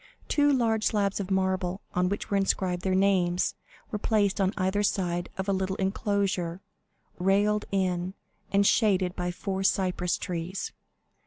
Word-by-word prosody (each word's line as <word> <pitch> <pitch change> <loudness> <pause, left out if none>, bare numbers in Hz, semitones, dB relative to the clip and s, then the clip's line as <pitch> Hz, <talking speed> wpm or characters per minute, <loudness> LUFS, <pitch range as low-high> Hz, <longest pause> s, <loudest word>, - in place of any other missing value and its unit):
Two 290 -1 +3
large 225 -5 +2
slabs 200 -2 +1
of 195 -1 -4
marble, 190 -1 0
on 180 0 +2
which 205 +1 -4
were - - +2
inscribed 190 -2 0
their 190 0 0
names, 185 -2 +2 0.4
were 210 - -2
placed 205 -2 +1
on 190 0 +2
either 190 +1 +1
side 175 -3 0
of 190 +1 -3
a 200 - +2
little 190 0 -1
enclosure, 195 -3 -1 0.6
railed 205 +3 +2
in, 185 -1 0 0.4
and 200 0 +3
shaded 190 -5 +3
by 180 0 -2
four 190 +2 -3
cypress 185 -2 +1
trees. 180 +1 -4
190 Hz, 150 wpm, -28 LUFS, 180-200 Hz, 0.6 s, Two